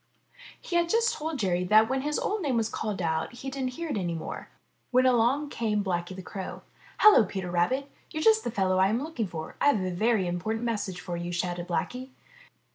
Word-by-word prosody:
He 345 - -2
had 340 0 +2
just 460 +4 +3
told 315 0 -4
Jerry 180 -6 0
that 215 +4 +6
when 265 +2 0
his 300 +2 -1
old 420 0 -1
name 275 -7 0
was 225 -1 +1
called 205 -4 -3
out 160 +3 -1
he 265 +3 -6
didn't 260 -2 -3
hear 335 0 -4
it 255 - -1
any 175 -3 -2
more, 165 - -6 0.4
when 255 0 +4
along 255 +4 +3
came 210 -3 0
Blacky 175 -1 -2
the 190 - -8
Crow. 190 +1 -7 0.3
''Hello, 420 - +8
Peter 190 -2 -4
Rabbit! 255 +11 +1 0.2
You're 310 - -3
just 440 0 +5
the - - -2
fellow 190 -4 +1
I 190 - +5
am 225 +6 0
looking 295 -9 -3
for; 160 -3 -7
I've 285 -7 +4
a 185 - -2
very 215 +2 +1
important 215 +7 -2
message 205 -6 -2
for 175 -2 -5
you," 175 +1 -4
shouted 175 0 -2
Blacky. 250 +9 -3
220 Hz, 210 wpm, -28 LUFS, 180-270 Hz, 0.4 s, Hello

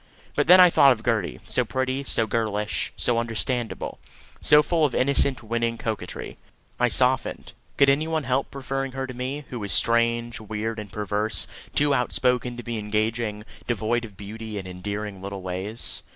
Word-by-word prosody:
But - - +1
then 180 +2 +9
I 180 -1 +8
thought 140 -4 +7
of 110 -2 -10
Gertie, 110 -6 0
so - - +1
pretty, 130 +1 -2
so 115 -4 +2
girlish, 105 -1 -1
so 120 -1 +2
understandable, 115 +1 -2 0.4
so 150 0 +6
full 165 0 +1
of 145 -4 +2
innocent 130 -1 +3
winning 115 +1 -1
coquetry. 110 -2 -5 0.4
I - - +4
softened. - - +1 0.2
Could 140 - +6
any 140 +3 +3
one 160 -2 -1
help 130 +1 0
preferring 135 -1 -4
her 135 0 -3
to 130 - -7
me, 130 +4 -4
who 125 - -4
was 100 -2 -4
strange, 115 0 +2
weird, 110 +1 -4
and 105 -3 -8
perverse 105 +2 0 0.3
too 145 -1 +3
outspoken 125 -1 +1
to 120 - -6
be 115 -2 -3
engaging, 105 0 -2 0.2
devoid 120 +1 0
of 105 -4 -10
beauty 110 +1 -7
and 95 -2 -6
endearing 100 +2 -5
little 100 -1 -6
ways? 95 +5 -3
115 Hz, 170 wpm, -25 LUFS, 105-130 Hz, 0.4 s, then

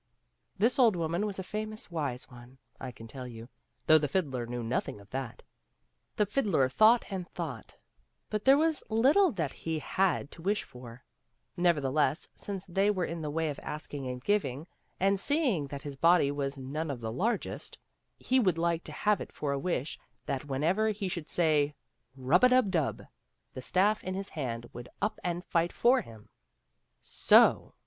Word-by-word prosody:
*' - - -49
This 230 +7 +2
old 230 -6 +5
woman 170 +4 -1
was 200 - -4
a 190 - -4
famous 215 0 -5
wise 140 -7 -3
one, 125 +1 -14 0.2
I 130 - -6
can 115 -1 -12
tell 130 +1 -8
you, 115 0 -10 0.4
though 155 0 +7
the 145 - -1
fiddler 135 -7 -1
knew 120 0 -4
nothing 115 -2 -2
of 100 0 -17
that. 130 -3 -5 0.7
The 210 - +2
fiddler 200 - +1
thought 220 - +5
and 185 -2 -4
thought, 150 -10 -6 0.6
but 210 0 -1
there 270 +1 +6
was 320 0 +2
little 280 - +4
that 160 -8 -2
he 160 -1 -3
had 180 -1 0
to 170 - -11
wish 205 +4 0
for; 125 +1 -12 0.5
nevertheless, 150 -4 +1
since 195 -2 -6
they 195 +3 +1
were 185 -4 0
in 165 0 -5
the 150 - -3
way 160 +1 -1
of 140 - -8
asking 145 -3 -6
and 125 0 -5
giving, 155 -9 0 0.3
and 195 +1 +2
seeing 255 - +1
that 140 0 -7
his 145 -2 -6
body 165 0 +4
was 140 -1 -3
none 145 +4 -4
of 135 -4 -4
the 110 -1 -4
largest, 210 - -2 0.4
he 260 +1 +2
would 185 -8 +2
like 170 0 0
to - - -8
have 210 -2 +1
it - - -7
for 145 - -3
a 140 - -1
wish 155 -2 -2 0.3
that 135 0 -3
whenever 160 +10 +1
he 210 -2 -2
should 170 -4 -5
say, 150 -4 +2 0.2
" 125 - -44
Rub 135 +7 +2
a^dub 250 -5 +5
dub," 160 -6 -1 0.5
the 130 - -6
staff 190 - +2
in 185 0 -3
his 195 +1 -4
hand 120 -5 -4
would 120 0 -9
up 210 +2 -1
and 175 0 -2
fight 170 0 +1
for 255 +2 +3
him. 110 - -14 0.7
So - - +4
165 Hz, 185 wpm, -30 LUFS, 135-200 Hz, 0.7 s, though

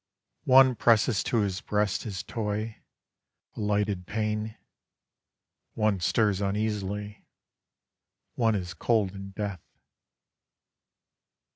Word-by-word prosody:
One 130 0 +7
presses 115 -3 +3
to 115 - +1
his 95 -2 -2
breast 105 -1 0
his 95 -6 -4
toy, 110 +1 -3 0.8
a - - -8
lighted 105 -3 0
pane: 110 0 -2 1.2
One 105 -3 +1
stirs 105 +2 +1
uneasily: 105 0 -3 1.1
one 115 -3 +2
is 90 -3 -3
cold 110 -5 +1
in 100 0 -8
death. 100 -3 -5
105 Hz, 95 wpm, -28 LUFS, 100-110 Hz, 1.2 s, One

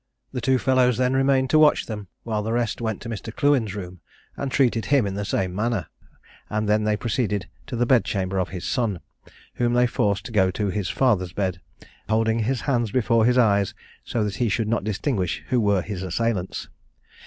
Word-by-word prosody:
Two 130 +2 +3
fellows 130 -2 +3
then 125 0 +2
remained 135 0 +2
to 155 - +5
watch 150 -1 +5
them, 105 -3 -6 0.2
while 110 -2 -1
the 110 +2 -3
rest 120 -1 -1
went 110 -3 -2
to - - -7
Mr. 110 0 -5
Clewen's 125 -6 +1
room, 90 -3 -7 0.4
and 140 -1 -4
treated 120 -5 +2
him 140 -5 +3
in 100 - -2
the 100 +1 -3
same 95 -2 -1
manner, 105 -3 -1 0.6
and 105 0 -1
then 105 +1 +2
they 105 0 +1
proceeded 105 -5 -1 0.2
to 135 - -4
the 120 +1 +1
bed 125 -1 +4
chamber 95 -1 -2
of 90 - -1
his 90 0 -6
son, 110 -8 -1 0.6
whom 120 -1 +1
they 125 0 +4
forced 105 -3 0
to - - -7
go 95 -4 +3
to 100 +2 -2
his 100 -2 -2
father's 95 -9 +1
bed, 95 -3 -2 0.5
holding 110 +1 +2
his 120 +3 0
hands 120 -5 0
before 115 0 +2
his 125 +1 +3
eyes, 100 -5 +3 0.3
so 115 - -1
that 105 -1 -3
he 120 -3 +1
should 110 +2 0
not 115 -1 0
distinguish 105 - -1
who 125 -2 +2
were 100 -4 +2
his 100 -4 -5
assailants. 95 +1 -2
110 Hz, 200 wpm, -24 LUFS, 100-125 Hz, 0.6 s, to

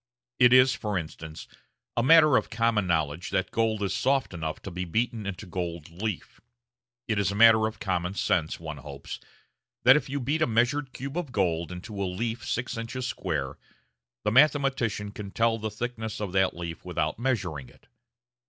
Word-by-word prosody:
It 125 - +7
is, 130 0 +7
for 105 -3 -2
instance, 80 -1 -7 0.5
a - - +2
matter 155 +1 +7
of - - +1
common 110 -3 +1
knowledge 80 -1 0
that 95 - -1
gold 110 -2 0
is 100 - -1
soft 135 -4 +1
enough 80 -2 -4
to 100 - -6
be 90 +1 -3
beaten 110 +3 -1
into 100 +1 -5
gold 85 -3 -5
leaf. 100 +2 -5 0.7
It 110 -3 0
is 100 -1 +1
a - - -4
matter 110 0 +7
of 110 - -8
common 90 -1 -2
sense, 80 -5 0
one 80 -2 -6
hopes, 70 0 -8 0.6
that 130 +2 +8
if 150 - 0
you 140 +1 -2
beat 145 +5 -1
a - - +4
measured 125 +5 +1
cube 140 +4 -6
of 160 -7 -6
gold 85 -6 0
into 100 +3 -6
a - - +1
leaf 115 +5 -3
six 125 -1 -2
inches 120 +2 -4
square, - - -3 0.6
the - - +1
mathematician 130 -6 +3
can 105 -1 -7
tell 115 +2 +1
the 110 0 -3
thickness 110 0 -5
of 105 -3 -3
that 95 0 +2
leaf 85 -1 -6
without - - -2
measuring 95 - -2
it. - - -22
110 Hz, 180 wpm, -27 LUFS, 90-120 Hz, 0.7 s, that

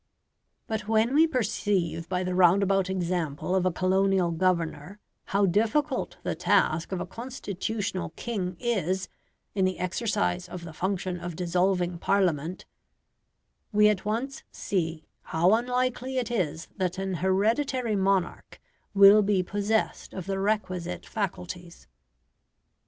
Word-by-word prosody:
But 215 -2 -4
when 225 +3 +2
we 315 +3 +6
perceive 195 - -1
by 185 0 0
the 185 0 -2
roundabout 190 +1 +4
example 175 -3 -2
of 185 -1 +2
a - - +2
colonial 185 0 +2
governor 170 0 -1 0.3
how 200 +1 +2
difficult 230 - 0
the - - -1
task 160 +4 +1
of 190 - -2
a 175 - -3
constitutional 205 - -4
king 185 -7 -3
is 190 -5 -1 0.4
in 195 - +1
the 185 0 +1
exercise 185 -1 -1
of 175 0 -7
the 165 -2 -8
function 185 0 -2
of 175 -1 -6
dissolving 180 0 0
Parliament, 180 -4 0 1.1
we 210 0 +5
at 205 -3 0
once 235 +6 -2
see 165 -4 -2 0.2
how 175 +5 +3
unlikely 250 +2 0
it 240 -2 -1
is 165 -7 -1
that 185 -1 -1
an 190 0 -2
hereditary 225 +5 +1
monarch 195 -2 0 0.4
will 200 +2 +8
be 200 -2 +2
possessed 205 +3 -1
of 185 - -5
the 195 0 -2
requisite 190 -4 -2
faculties. 180 -4 -5
190 Hz, 130 wpm, -27 LUFS, 180-210 Hz, 1.1 s, will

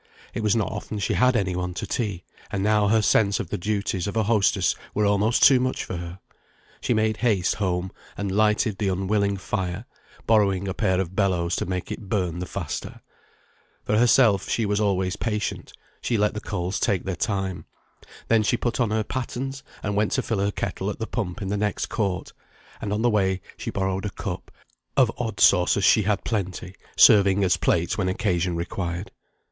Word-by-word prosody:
it - - -3
was 105 0 +2
not 110 -3 0
often 105 +1 -5
she 100 - -1
had 125 0 +3
any 95 -5 0
one 90 0 -3
to - - -3
tea; 100 -7 -3 0.3
and 100 - -1
now 105 0 +3
her 110 +1 +3
sense 100 -1 +3
of 85 - -4
the 105 - -1
duties 100 -1 -1
of 100 - -3
a 110 - +3
hostess 100 -4 +2 0.2
were 105 - +2
almost 105 +3 +2
too 130 -2 +7
much 130 +1 -1
for 90 - -5
her. 85 +1 -7 0.6
She - - -1
made 110 -1 +2
haste 105 -6 +1
home, 95 -2 -2 0.3
and 100 -1 -2
lighted 105 +1 +2
the 105 - 0
unwilling 100 +1 0
fire, 95 +2 -3 0.4
borrowing 100 -3 +2
a 95 - -2
pair 95 0 +1
of 95 -1 -3
bellows 90 -4 +1
to - - -2
make 90 -1 -3
it 100 - -7
burn 90 -5 -1
the 90 - -4
faster. 90 -6 -5 0.8
For 105 - 0
herself 115 -3 +4
she 115 - +1
was 105 0 0
always 95 -3 0
patient; 105 -2 -3 0.3
she 120 - 0
let 105 0 +2
the 105 - -5
coals 95 -2 -3
take 95 -4 +1
their 95 -1 -3
time. 95 -2 -2 0.6
Then 115 -1 +4
she 115 +3 +1
put 120 +1 -2
on 120 -4 +2
her 110 0 0
pattens, 130 +3 -4 0.2
and 100 -1 -1
went 105 +1 +1
to 130 - +1
fill 115 -3 -1
her 100 +1 +1
kettle 100 -1 -3
at 105 - -4
the 110 - -3
pump 105 -5 -4
in 95 - -3
the 105 - -1
next 105 0 -1
court, 100 -5 -2 0.5
and 100 - -3
on 105 +2 -1
the 120 - +4
way 95 -3 +1 0.2
she - - -5
borrowed 95 0 -2
a - - -1
cup; - - -6 0.5
of 125 -4 +5
odd 110 -5 -3
saucers 95 +1 +4
she 110 - +5
had 105 0 0
plenty, 95 -4 -3 0.2
serving 100 -1 +6
as 90 -1 +3
plates 85 +5 0
when 95 -2 +1
occasion 90 -1 0
required. 85 +2 -4
100 Hz, 200 wpm, -24 LUFS, 95-110 Hz, 0.8 s, too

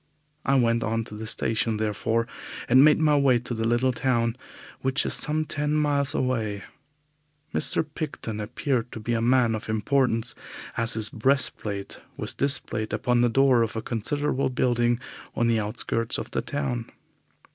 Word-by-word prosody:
I 135 - +2
went 115 -2 +2
on 115 0 -1
to 105 - -10
the 110 +1 -6
station, 110 0 0
therefore, 110 +2 0 0.4
and 130 +3 +6
made 150 0 +6
my 155 -2 +3
way 135 -3 +4
to 120 +1 -5
the 115 -1 -1
little 120 +2 +2
town, 120 -2 0 0.4
which 130 +2 0
is - - +1
some 155 +1 +1
ten 150 0 -1
miles 145 -2 +1
away. 110 -6 -1 0.9
Mr. - - +3
Picton 145 -8 -6
appeared 120 +2 -2
to - - -6
be 120 +2 -2
a 115 - 0
man 120 -1 +3
of 110 0 -5
importance, 115 +1 +1 0.4
as 115 -1 +2
his 110 -1 +2
brass 130 +4 +1
plate 100 -2 -6 0.2
was - - -3
displayed 115 -6 +1
upon 125 -1 +1
the 120 - +3
door 130 0 +4
of 115 -1 -1
a 110 - -2
considerable 135 +5 -1
building 120 -1 +1 0.4
on 120 - +1
the 115 -1 +2
outskirts 110 +2 -2
of - - -6
the - - -1
town. 130 -5 -3
120 Hz, 170 wpm, -25 LUFS, 115-135 Hz, 0.9 s, and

